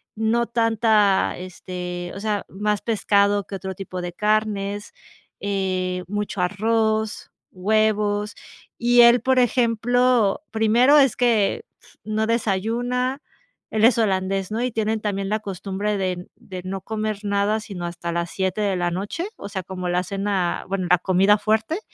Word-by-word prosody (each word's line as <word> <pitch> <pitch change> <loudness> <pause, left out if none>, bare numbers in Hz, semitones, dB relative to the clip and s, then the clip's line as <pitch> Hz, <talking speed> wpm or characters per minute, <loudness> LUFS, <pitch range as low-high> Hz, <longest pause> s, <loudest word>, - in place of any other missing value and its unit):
no 225 +2 +1
tanta 225 -3 +2
este, 180 -1 -6
o - - -6
sea, 210 -1 -2
más 210 +1 -1
pescado 205 -2 +2
que 195 - -7
otro 190 -1 -5
tipo 185 -2 -6
de 175 0 -4
carnes 210 - -1 0.5
eh, 185 -2 -2
mucho 205 -1 -3
arroz, 220 +3 0 0.2
huevos. 210 +1 +1 0.4
Y 240 0 +5
él, 235 +1 +7
por 260 -1 +3
ejemplo, 245 -1 +2
primero 235 +6 +4
es 270 -4 +4
que 225 -5 +2 0.4
no 215 0 -1
desayuna. 240 +5 -1 0.5
Él 220 0 +3
es 235 -1 +4
holandés, 195 -2 0
¿no?, 230 +3 -1
y 250 - -1
tienen 220 0 -1
también 200 -2 -2
la 215 +1 0
costumbre 200 +1 -3
de 180 -2 -2
de 185 -2 -9
no 190 0 -5
comer 215 0 -3
nada, 205 +1 +1
sino 190 -5 -7
hasta 170 0 -5
las 170 0 -2
7 190 +2 -1
de 200 -2 +1
la 175 -1 0
noche, 200 - -4
o - - -7
sea, 195 -2 -4
como 185 -1 -5
la 180 +1 +1
cena, 195 -1 -2
bueno, 185 -2 -2
la 180 - +6
comida 190 +3 +3
fuerte. 220 - 0
205 Hz, 150 wpm, -23 LUFS, 190-220 Hz, 0.5 s, él